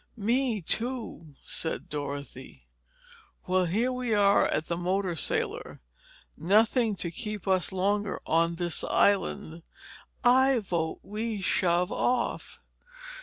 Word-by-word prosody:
"Me 230 -1 0
too," 225 - -3
said 160 - -3
Dorothy. 140 - -7 0.8
"Well, 185 0 +2
here 225 +9 0
we 250 -3 -1
are 200 -1 +4
at 155 - -1
the 170 - -2
motor 180 +1 -1
sailor. - - -2 0.6
Nothing 215 - +3
to 170 -2 -4
keep 210 +1 -6
us 185 -3 +2
longer 200 +1 0
on 165 +1 +2
this 175 -1 -1
island. 175 -4 +1 0.6
I 260 +1 +5
vote 170 -7 -2
we 215 +1 -4
shove 180 -1 +1
off." 245 -1 -1
190 Hz, 115 wpm, -28 LUFS, 170-225 Hz, 0.8 s, I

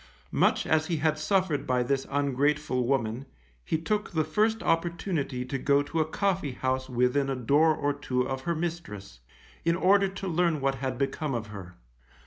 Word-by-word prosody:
Much - - +2
as 155 0 +2
he 170 - 0
had 155 0 +1
suffered 170 -2 0
by 125 -1 +2
this 135 +2 -1
ungrateful 140 -1 0
woman, 130 -1 -1 0.4
he 160 - 0
took 210 +6 -1
the 160 -2 0
first 215 +8 +1
opportunity 165 -6 -1
to 135 +1 -3
go 140 +1 +3
to 160 +3 -3
a 155 - +3
coffee 185 -5 -1
house 130 +1 -2
within 125 +3 +1
a 135 - 0
door 145 +6 +3
or 145 0 0
two 130 -3 -1
of 135 0 -3
her 170 +5 -1
mistress, 155 - -5 0.4
in 170 0 +2
order 195 +2 +4
to 195 0 -6
learn 170 -2 +1
what 135 0 +1
had 130 -1 -3
become 135 +1 -1
of 115 -2 -4
her. 90 -3 -9
145 Hz, 180 wpm, -28 LUFS, 130-165 Hz, 0.4 s, order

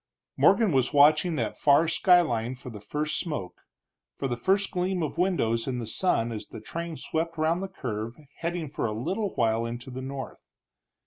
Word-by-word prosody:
Morgan 225 -5 +4
was 130 -1 +2
watching 155 +4 +5
that - - -2
far 145 +3 +4
skyline 140 -10 +3
for 125 0 -9
the 105 -2 -9
first 150 +7 -2
smoke, 150 - -5 0.6
for - - -1
the 120 - -1
first 190 +10 +1
gleam 180 -1 -1
of 155 +2 -4
windows 115 -12 +1
in 130 -2 -1
the 120 - -3
sun 115 - 0
as 110 -2 -6
the - - -9
train 170 -1 -5
swept 165 +1 -3
round 160 +3 +1
the 195 - -3
curve 115 - -5 0.2
heading 170 -1 -3
for 135 -4 -2
a 105 - -3
little 190 - -2
while 115 -1 +2
into 120 +3 -6
the 130 +1 -6
north. 135 -2 -7
145 Hz, 185 wpm, -27 LUFS, 120-170 Hz, 0.6 s, watching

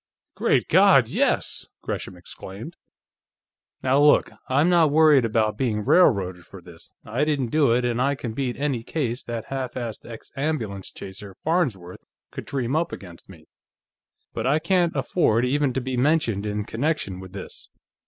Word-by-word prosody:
"Great - - +1
God, - - +5
yes!" - - 0 0.2
Gresham 90 - -5
exclaimed. 100 - -10 1.1
"Now 130 +2 +3
look. 145 0 +4 0.2
I'm 140 +5 +3
not 170 -3 +4
worried 150 -4 +5
about 110 -1 0
being 105 -5 -1
railroaded 95 - +3
for 95 - -13
this. 85 -2 -14
I 120 +7 -1
didn't 145 -6 -1
do 150 -5 +3
it, 120 +1 +2
and 120 0 0
I 140 +2 +1
can 120 -4 -6
beat 125 0 -3
any 140 -4 -1
case 125 -1 -3
that 115 -1 -5
half 130 -2 -4
assed 120 -4 -5
ex 115 -1 -11
ambulance 125 -10 -3
chaser, 95 0 -9
Farnsworth, 125 - -1 0.3
could - - -7
dream 130 0 -2
up 165 +1 0
against 90 -2 -11
me. 80 -5 -14 0.9
But 115 +1 -2
I 145 +3 +3
can't 170 +1 +1
afford 120 -9 +1
even 140 +1 +1
to 130 - -1
be 130 +1 -3
mentioned 120 -7 +1
in 105 0 -2
connection 120 - -2
with 95 0 -11
this. 95 - -9
125 Hz, 165 wpm, -24 LUFS, 105-145 Hz, 1.1 s, God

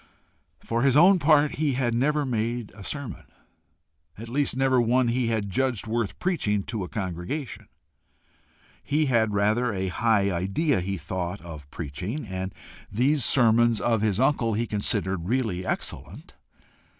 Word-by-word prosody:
For 115 +1 -2
his 135 +1 +4
own 185 +4 +7
part 150 -1 +3
he 150 -2 +1
had 125 -2 0
never 145 +5 +1
made 120 -2 -2
a 100 - -10
sermon, 140 0 -6 0.9
at 115 +2 -8
least 135 0 0
never 130 -2 +3
one 120 +1 +2
he 120 0 0
had 110 -3 -1
judged 130 0 -1
worth 110 -3 -2
preaching 105 - 0
to 110 -2 -4
a 90 - -7
congregation. 100 - -5 1.1
He 150 +2 +1
had 110 -5 +2
rather 110 +4 +2
a 95 -2 -2
high 105 0 +2
idea, 95 - 0
he 95 +2 -3
thought, 90 +1 -4
of 75 -4 -10
preaching, 90 - -5
and 95 -1 -4 0.4
these 130 +6 +2
sermons 120 -2 +4
of 115 -3 +1
his 105 -2 +1
uncle 125 -5 +2
he 115 +2 0
considered 100 -4 -2
really 110 -8 0
excellent. - - -4
115 Hz, 150 wpm, -26 LUFS, 100-130 Hz, 1.1 s, own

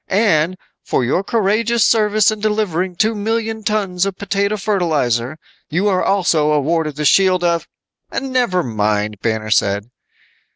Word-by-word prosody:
And 185 -4 +1 0.3
for 125 - 0
your 175 +10 0
courageous 225 +2 +1
service 215 -1 +3
in 215 - -5
delivering 200 -4 -1
two 220 +5 +1
million 220 +1 -2
tons 200 -4 -1
of 195 -1 -2
potato 200 +1 -1
fertilizer, 155 - -1 0.3
you 180 +7 0
are 185 -2 +1
also 170 -6 +2
awarded 155 +1 0
the 150 0 -3
shield 185 +1 +4
of 170 -1 0 0.3
" - - -50
"Never 250 -9 0
mind," 105 -3 -1
Banner 110 -1 -2
said. 100 +2 +1
185 Hz, 140 wpm, -18 LUFS, 150-210 Hz, 0.3 s, shield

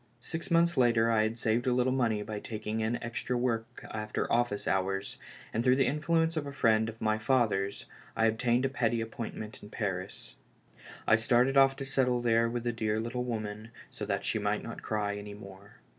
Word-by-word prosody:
Six 165 +7 -5
months 170 0 +3
later 115 -2 +4
I 110 -1 +4
had 110 +2 0
saved 115 +2 0
a 125 - +3
little 125 +1 +2
money 115 -5 +1
by 105 0 -5
taking 110 0 -4
in 110 +2 0
extra 120 +1 -2
work 115 -2 -2
after 105 0 -2
office 120 -4 +1
hours, 95 +1 -1 0.3
and 115 - 0
through 130 0 +5
the 135 0 +3
influence 165 +3 +1
of 150 -2 -2
a - - -5
friend 110 -5 +2
of 110 0 -10
my 110 0 +1
father's 110 -5 +1 0.3
I 115 - +3
ob 110 0 +1
tained 125 +1 +2
a - - +1
petty 120 -3 0
appointment 115 -1 -6
in 105 - -11
Paris. 95 -4 -4 0.7
I 110 - +5
started 120 +4 +3
off 135 0 +6
to 135 - -5
settle 130 -2 +1
there 115 -1 +3
with 120 0 -3
the 120 - 0
dear 110 -1 -1
little 120 +2 -3
woman 110 -2 -4 0.2
so - - -7
that - - -1
she - - 0
might - - -1
not - - -7
cry 105 -1 -2
any 105 0 -7
more. 100 0 -13
115 Hz, 205 wpm, -30 LUFS, 110-125 Hz, 0.7 s, off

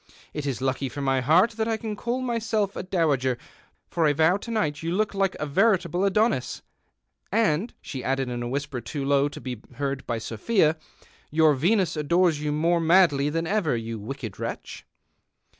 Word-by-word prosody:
It 150 -1 -4
is 130 -2 -3
lucky 135 0 -1
for 145 - -7
my 135 -1 +2
heart 170 - +4
that 220 0 -2
I 225 -1 0
can 220 -1 -5
call 240 +4 -2
myself 225 -4 -1
a - - -3
dowager, 150 -9 +1 0.5
for 165 -2 +1
I 145 - +3
vow 160 +5 +3
to 215 - -9
night 205 -11 -1
you 165 +1 -2
look 210 +3 0
like 195 -1 0
a - - -1
veritable 180 +2 +2
Adonis, 200 - +1 0.7
and," 210 -1 +1
she 130 -3 -6
added 135 0 0
in 120 -1 -4
a 120 - -3
whisper 140 -1 -3
too 140 +4 -4
low 140 +1 +3
to - - -9
be 125 -4 -6
heard 135 0 -3
by 115 - -1
Sophia, 155 - +1 0.3
" - - -29
your 155 -2 +6
Venus 175 +5 +1
adores 160 +1 +2
you 150 0 -1
more 165 +3 +2
macll\' 160 -4 +4
than 165 +1 -1
ever, 180 - +1
you 115 -1 -5
wicked 110 -1 -7
wretch. - - -6
155 Hz, 190 wpm, -25 LUFS, 135-195 Hz, 0.7 s, your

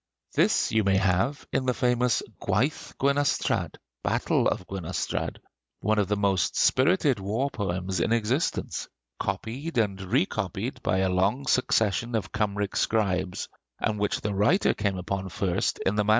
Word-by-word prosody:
This - - +3
you 110 -1 +3
may 95 -1 +3
have 95 +9 +1
in 130 - 0
the 125 - +2
famous 125 -2 +2 0.2
'Gwaith 115 +10 -1
Gwenystrad' 140 +1 +1 0.3
(Battle - - +1
of 90 - -1
Gwenystrad), 90 -2 -3 0.4
one 110 +1 +2
of 100 - +2
the 105 - +1
most 95 -5 +1
spirited 140 - +3
war 110 +9 -1
poems 95 -2 -2
in 110 - +1
existence, 115 +7 0 0.3
copied 125 - -3
and 100 -4 +1
recopied 110 - -1
by 95 - +1
a 95 - +2
long 100 +9 +1
succession 115 -3 +1
of 105 -4 -2
Kymric 105 -2 -1
scribes, 95 -4 0 0.3
and 105 -1 -1
which 105 - 0
the 105 - -2
writer 105 - +3
came 100 -3 -1
upon 95 +1 -3
first 90 -1 0
in 95 - +2
the 105 - +3
MS. 105 - -2
105 Hz, 150 wpm, -27 LUFS, 95-125 Hz, 0.4 s, This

